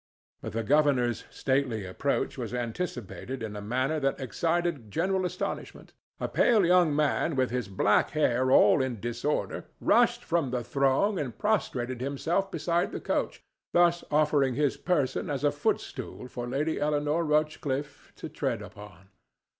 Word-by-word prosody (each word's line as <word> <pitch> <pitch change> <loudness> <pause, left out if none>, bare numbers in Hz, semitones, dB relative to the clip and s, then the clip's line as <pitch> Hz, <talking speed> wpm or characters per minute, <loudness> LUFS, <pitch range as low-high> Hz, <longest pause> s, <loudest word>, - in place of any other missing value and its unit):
But - - -6
the 115 +1 -1
governor's 130 -3 +2
stately 130 -6 -1
approach 90 -1 -1
was - - -4
anticipated 120 - -4
in 105 -1 -5
a 105 - -5
manner 130 +8 -1
that 135 -1 0
excited 160 -1 -1
general 185 - 0
astonishment. - - -6 0.3
A - - -1
pale 220 -6 +3
young 175 -4 +4
man 150 +1 +1
with 130 -3 +1
his 125 -4 -2
black 100 +2 +2
hair 130 -4 +1
all 135 - +6
in 130 -4 -2
disorder 120 +6 -2
rushed - - +3
from 165 -5 0
the 125 -1 -2
throng 140 - +1
and 125 -6 -4
prostrated 130 - -1
himself 160 +8 -1
beside 175 +4 0
the - - -4
coach, - - -2 0.3
thus 175 0 +4
offering 145 -4 +2
his 145 0 +1
person 150 -8 -1
as - - -2
a - - +4
footstool 125 - -3
for 120 -1 -6
Lady 145 +5 -1
Eleanore 150 +2 +1
Rochcliffe 150 -2 -1
to - - -7
tread - - -3
upon. 95 +4 -13
140 Hz, 150 wpm, -28 LUFS, 125-160 Hz, 0.3 s, all